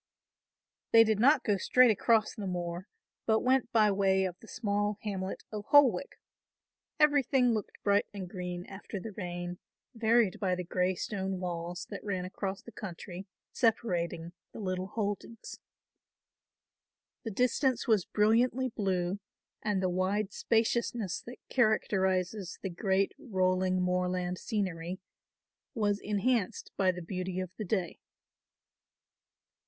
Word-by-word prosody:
They 225 0 +9
did 220 -2 +1
not 275 +3 +5
go 205 -3 +2
straight 250 +4 +5
across 215 +1 +2
the 205 -4 -5
moor, 175 0 -4 0.4
but 220 -1 +3
went 255 -2 +2
by 215 -2 +4
way 190 -1 +2
of 180 -2 -3
the 225 - -15
small 205 -2 -1
hamlet 195 -2 -4
of 210 -1 -5
Holwick. 280 -2 +4 0.8
Everything 275 -4 +4
looked 215 -2 -4
bright 200 0 +3
and 195 -3 -6
green 180 -1 -5
after 200 +1 -7
the 220 +4 -7
rain, 175 -2 -5 0.3
varied 225 -3 +2
by 185 -3 +1
the 180 - -4
grey 180 +1 0
stone 190 0 -3
walls, 175 -1 -4
that 200 - -6
ran 185 -3 -2
across 195 +1 -4
the 235 - -11
country, 190 -2 -8 0.2
separating 175 -8 0 0.2
the - - -8
little 185 -2 -2
holdings. 210 +2 -4 1.6
The 225 - -3
distance 250 +4 +1
was 215 -5 +4
brilliantly 240 +5 +2
blue 190 -3 -1 0.4
and 205 -3 0
the - - +3
wide 190 +3 0
spaciousness 225 -3 0
that 245 - -8
characterises 190 -5 +1
the 190 - -2
great 190 +2 +1
rolling 185 -5 +1
moorland 180 0 0
scenery 185 -4 -2 0.8
was 205 -3 +1
enhanced 210 0 -1
by 190 -1 +3
the 180 -1 -7
beauty 185 +1 -3
of 185 -1 -4
the 215 - -4
day. 185 -3 -2
200 Hz, 130 wpm, -31 LUFS, 185-225 Hz, 1.6 s, They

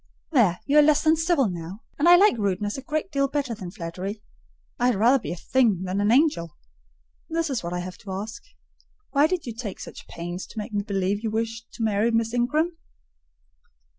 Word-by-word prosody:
"There, 210 - +3
you 290 +2 +5
are - - +9
less 295 0 +4
than 315 0 +5
civil 325 -5 +2
now; 175 +3 -6 0.2
and 320 +4 +5
I 350 - +10
like 395 -4 +5
rudeness 205 -1 -1
a 270 - -5
great 310 +6 -3
deal 275 -1 +2
better 275 -3 -2
than 190 -5 -7
flattery. 190 +3 -6 0.6
I 245 - +3
had 250 - +3
rather 240 +7 +4
be 225 - -6
a - - -3
thing 210 0 +1
than 190 +2 -1
an 205 +2 +2
angel. 240 - +2 0.7
This 330 -2 -1
is 255 - -1
what 170 - -4
I 180 0 -2
have 185 +1 -8
to 200 - -9
ask,—Why 280 - -3
did 360 -1 -2
you 235 - -5
take 220 -4 -6
such - - -10
pains 175 +2 -6
to - - -15
make 210 0 -5
me 205 - +1
believe 200 0 -1
you 225 - 0
wished 230 +1 -3
to 230 - -4
marry 215 +1 +2
Miss 225 0 0
Ingram?" 310 +8 0
225 Hz, 205 wpm, -25 LUFS, 195-285 Hz, 0.7 s, I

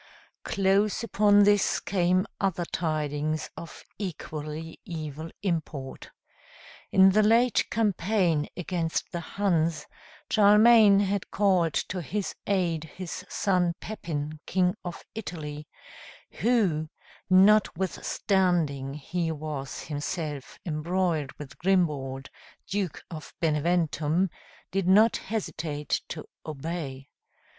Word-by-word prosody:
Close 195 +3 +1
upon 205 -2 +4
this 205 -1 +3
came 185 0 +1
other 180 -3 0
tidings 155 -3 -2
of 170 - -10 0.2
equally 160 -4 -6
evil 155 -1 -6
import. 155 -7 -3 0.8
In 190 0 +7
the 215 +3 +4
late 230 +2 +3
campaign 190 -7 +1
against 170 -2 -2
the 175 - -3
Huns, 170 -2 0 0.5
Charlemagne 210 -1 +7
had 200 -1 -1
called 185 -6 +2
to 185 -1 -2
his 195 +6 -3
aid 175 -5 0
his 180 +2 -7
son 180 -3 +1
Pepin, 155 -7 -5
King 180 +1 +2
of 175 -1 -7
Italy, 155 -8 -6 0.7
who, 190 -11 +2 0.4
notwithstanding 185 -6 +2
he 165 +3 -2
was 150 -3 -5
himself 145 -1 -4
embroiled 165 -2 -1
with 145 -2 -11
Grimbald, 145 -8 0 0.4
Duke 195 -4 -3
of 155 -2 -9
Beneventum, 165 +2 +1 0.4
did 195 -1 0
not 215 +4 +5
hesitate 160 -9 -3
to - - -6 0.2
obey. 145 -3 -5
175 Hz, 100 wpm, -27 LUFS, 155-195 Hz, 0.8 s, In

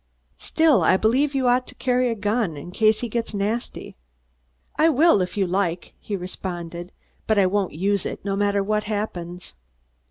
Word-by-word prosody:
"Still, 320 -5 +3
I 185 - +4
believe 265 +8 +1
you 260 -2 +1
ought 250 +1 +2
to 250 - -10
carry 250 -1 +1
a 230 - -1
gun, 210 -5 -1
in 175 +5 -8
case 215 +2 +2
he 240 - -2
gets 230 -1 -3
nasty." 210 +4 -3 0.8
"I 320 +2 +4
will, 315 - +4
if 180 +2 -4
you 195 - +2
like," 180 -1 -2
he 205 - -4
responded; 175 -1 -6 0.4
"but 220 - +2
I 195 - +5
won't 195 0 0
use 195 +5 0
it, - - -7
no 195 -1 -1
matter 200 0 +1
what 210 +1 -1
happens." 180 -4 -5
205 Hz, 180 wpm, -23 LUFS, 185-240 Hz, 0.8 s, I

